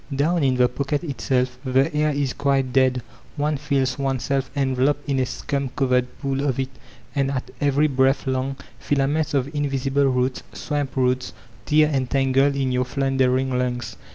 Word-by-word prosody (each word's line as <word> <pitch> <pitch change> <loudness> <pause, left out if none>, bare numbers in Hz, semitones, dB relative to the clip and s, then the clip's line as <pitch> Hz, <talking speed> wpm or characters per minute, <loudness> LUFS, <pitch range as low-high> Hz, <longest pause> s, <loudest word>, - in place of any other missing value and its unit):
Down 160 +4 +1
in 130 -2 +3
the 125 0 +4
pocket 140 +4 -2
itself 130 -4 -1
the 135 +4 +2
air 150 0 +2
is 140 -3 -1
quite 135 -3 0
dead; 130 -2 +3 0.3
one 150 +1 0
feels 135 -3 -1
oneself 135 0 -1
enveloped 135 +1 +1
in 135 -2 +1
a 130 - +1
scum 140 +2 -3
covered 125 -2 +2
pool 135 -1 -2
of 135 -3 0
it, 130 0 -1 0.4
and 140 -1 +1
at 130 -2 -4
every 145 +1 +3
breath 135 -1 +2
long 130 +1 -1 0.2
fila 140 -2 +1
ments 150 0 0
of 135 -2 +2
mvisible 140 -1 +1
roots, 125 0 0
swamp 145 -3 -3
roots, 130 -1 0 0.3
tear 150 0 +5
and 130 -2 0
tangle 135 +1 +2
in 135 -2 0
your 125 0 +1
floundering 130 0 +1
lungs. 125 -1 -2
135 Hz, 170 wpm, -23 LUFS, 130-140 Hz, 0.4 s, tear